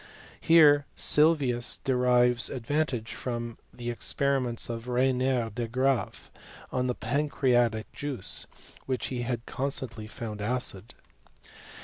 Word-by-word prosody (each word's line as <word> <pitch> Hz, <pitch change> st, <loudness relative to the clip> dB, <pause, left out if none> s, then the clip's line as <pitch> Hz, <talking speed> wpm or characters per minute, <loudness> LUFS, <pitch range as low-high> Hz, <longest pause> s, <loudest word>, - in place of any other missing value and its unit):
Here 150 Hz, -3 st, +5 dB
Sylvius 145 Hz, -6 st, +3 dB
de 130 Hz, -, -1 dB
rives 125 Hz, -1 st, +3 dB
advantage 130 Hz, -2 st, -2 dB
from 120 Hz, -2 st, -5 dB
the 120 Hz, 0 st, -5 dB
experiments 130 Hz, -1 st, -1 dB
of 115 Hz, 0 st, -6 dB
Regnier 125 Hz, -1 st, +1 dB
de 120 Hz, +1 st, -3 dB
Graaf 130 Hz, -2 st, -1 dB, 0.4 s
on 125 Hz, 0 st, 0 dB
the 125 Hz, -, -1 dB
pancreatic 120 Hz, -4 st, 0 dB
juice, 140 Hz, -9 st, -2 dB, 0.4 s
which 130 Hz, -2 st, -2 dB
he 125 Hz, -, -2 dB
had 120 Hz, -1 st, -3 dB
constantly 125 Hz, -5 st, -4 dB
found 105 Hz, -1 st, -7 dB
acid. 110 Hz, -3 st, 0 dB
125 Hz, 110 wpm, -28 LUFS, 115-135 Hz, 0.4 s, Here